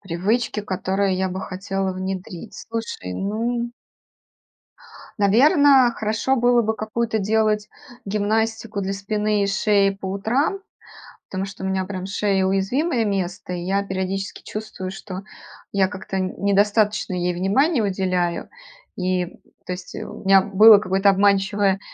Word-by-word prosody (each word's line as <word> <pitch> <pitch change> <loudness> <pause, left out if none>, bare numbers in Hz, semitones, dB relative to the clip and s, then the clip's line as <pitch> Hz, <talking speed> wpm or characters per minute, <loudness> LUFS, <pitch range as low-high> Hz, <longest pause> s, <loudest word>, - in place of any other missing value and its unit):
Привычки, 205 +6 -1
которые 190 0 -1
я 190 0 0
бы 185 +1 -5
хотела 195 0 -3
внедрить. 185 +1 -6
Слушай, 225 - -5
ну 235 - -2 1.5
Наверно, 265 - +5
хорошо 220 +5 0
было 245 0 +4
бы 220 +1 0
какую-то 220 +1 -2
делать 215 0 +1 0.4
гимнастику 215 +1 -1
для 195 0 -2
спины 210 +1 0
и - - 0
шеи 200 0 +2
по 195 0 -7
утрам, 230 - 0 0.7
потому 190 0 -3
что 195 -1 -9
у - - -1
меня, 190 -1 -1
прям, 185 -1 -5
шея- 195 -1 +1
уязвимое 225 - +1
место, 190 -2 -3
и 175 - -4
я 195 +3 0
периодически 190 0 -4
чувствую, 210 -3 -6
что 190 0 -7 0.5
я 195 -1 +2
как-то 190 0 -5
недостаточно 205 +2 +1
ей 180 -1 -1
внимания 235 - +2
уделяю. 185 -3 -1 0.5
И, 185 -1 0 0.4
то 180 - -2
есть 180 0 -9
у - - -8
меня 195 0 +6
было 210 +2 +7
какое-то 195 0 +2
обманчивое 195 0 +2
200 Hz, 130 wpm, -22 LUFS, 190-215 Hz, 1.5 s, было